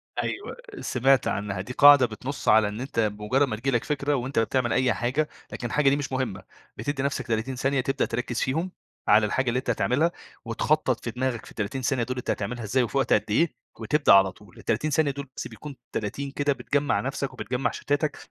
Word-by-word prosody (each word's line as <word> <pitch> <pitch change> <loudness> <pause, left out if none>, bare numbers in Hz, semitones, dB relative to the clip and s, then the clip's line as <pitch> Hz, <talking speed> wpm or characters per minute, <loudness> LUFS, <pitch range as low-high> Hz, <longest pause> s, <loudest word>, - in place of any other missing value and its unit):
أيوه، 405 - -4 0.2
سمعت 135 +1 +2
عنّها. 100 -2 -2
دي 125 +6 -7
قاعدة 145 -2 +8
بتنصّ 125 +5 -6
على 110 -1 +6
إن 105 +3 -5
أنت 130 -3 -3
بمجرد 105 +6 +1
ما 110 - -2
تيجي 135 +5 -1
لك 120 - +1
فكرة 145 0 -1
وأنت 130 -1 -1
بتعمل 120 +1 +1
أي 125 -2 +3
حاجة، 130 +7 -1 0.2
لكن 120 - -4
الحاجة 140 +4 +3
دي 140 - +3
مش 145 -2 -4
مهمّة، 120 -8 -2 0.3
بتدي 140 -1 -2
نفسك 140 -1 -2
30 115 +3 -1
ثانية، 135 +1 +1
تبدأ 135 +2 0
تركز 120 0 -3
فيهم 160 +8 -1 0.4
على 105 +1 +6
الحاجة 130 +5 0
اللي 120 - 0
أنت - - -6
هتعملها، 155 +7 +2 0.3
وتخطّط 130 +2 0
في 120 - -3
دماغك 125 -1 -2
في - - -12
ال30 110 +5 -3
ثانية 130 -2 +1
دول 130 +2 -4
أنت 125 - -5
هتعملها 120 +3 -2
إزاي، 125 +5 +1
وفي 120 - -2
وقت 135 - +2
قد - - +3
إيه، 160 +11 +2 0.3
وتبدأ 150 -6 +4
على 95 -1 +6
طول. 95 -1 -19
ال30 150 +8 -1
ثانية 150 -1 +2
دول، 140 0 -7
بس - - -4
بيكون 135 +6 -10 0.2
30 135 +7 -3
كده 145 0 +1
بتجمع 145 +1 0
نفسك 135 +1 -3
وبتجمع 125 +1 -2
شتاتك، 145 +1 -1
130 Hz, 205 wpm, -26 LUFS, 115-140 Hz, 0.4 s, قاعدة